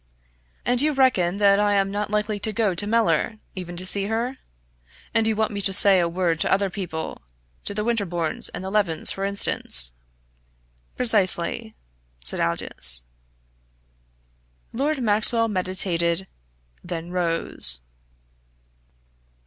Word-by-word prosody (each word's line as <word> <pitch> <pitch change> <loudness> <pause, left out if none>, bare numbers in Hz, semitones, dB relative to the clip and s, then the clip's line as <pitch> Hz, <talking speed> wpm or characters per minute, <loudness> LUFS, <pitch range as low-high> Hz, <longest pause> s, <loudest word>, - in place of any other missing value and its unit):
"And 245 0 +1
you 300 +1 0
reckon 225 -10 +1
that 200 -1 +3
I 205 0 +1
am 195 0 0
not 205 +1 -4
likely 210 0 -2
to 220 +2 -3
go 210 -2 -1
to 205 +4 -2
Mellor, 220 -2 0 0.2
even 175 -2 -8
to 185 - -5
see 195 +1 +5
her? 235 +4 -4 0.7
And 225 -1 +1
you 220 - 0
want 220 +1 -2
me 200 -1 -4
to 195 - 0
say 195 0 +7
a 170 -1 -1
word 170 -2 -2
to - - -1
other 195 -1 0
people 175 -5 -7 0.4
to 200 - -4
the 210 - -2
Winterbournes 185 -8 -2
and - - -9
the 190 - -6
Levens, 195 -7 +1
for 195 - -5
instance?" - - +3 1.1
"Precisely," 220 -1 +4 0.5
said - - +3
Aldous. 60 -7 +1 1.7
Lord 275 +2 -2
Maxwell 230 +2 +2
meditated; 185 -3 0 0.6
then 175 -1 -7
rose. 165 - -1
200 Hz, 135 wpm, -22 LUFS, 175-220 Hz, 1.7 s, say